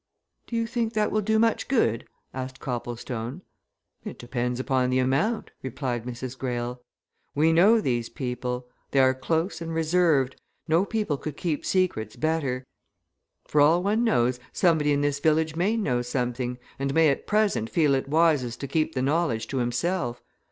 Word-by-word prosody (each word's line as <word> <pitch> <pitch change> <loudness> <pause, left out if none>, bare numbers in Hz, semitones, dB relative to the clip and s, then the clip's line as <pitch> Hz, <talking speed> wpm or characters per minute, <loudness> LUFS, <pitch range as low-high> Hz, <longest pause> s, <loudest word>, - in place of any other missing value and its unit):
"Do 235 - -5
you 230 0 +1
think 230 -1 -2
that 215 -1 +1
will 215 - +1
do 220 +2 +1
much 225 +1 +2
good?" 115 - +1 0.3
asked 130 0 -6
Copplestone. 120 +3 -5 0.6
"It - - -7
depends 125 0 -3
upon 130 -1 +1
the 130 - +1
amount," 135 - 0
replied 125 -2 -3
Mrs. 125 +1 -6
Greyle. 125 -1 -3 0.5
"We 160 +3 +4
know 205 +8 +6
these 120 - -1
people. 125 -2 -4 0.2
They 135 - +2
are 130 0 +5
close 160 +8 -1
and 165 -1 -4
reserved 160 -5 +2 0.3
no 165 +5 +3
people 210 -10 -1
could 150 +1 -6
keep 160 -5 -2
secrets 175 - 0
better. 145 -5 -1 0.8
For 150 - +3
all 165 +5 +5
one 215 +4 +1
knows, 125 - +2
somebody 160 -5 +2
in 145 0 +2
this 145 0 0
village 155 +1 +2
may 195 +7 +1
know 125 - 0
something, 125 0 -2 0.2
and 140 0 -1
may 160 -1 +5
at 140 - -2
present 210 - +1
feel 150 -4 +3
it 135 0 -1
wisest 150 -7 +2
to 140 - -3
keep 155 +2 0
the 130 - 0
knowledge 135 -6 +1
to 135 - -2
himself. 120 +1 -1
140 Hz, 165 wpm, -26 LUFS, 125-170 Hz, 0.8 s, know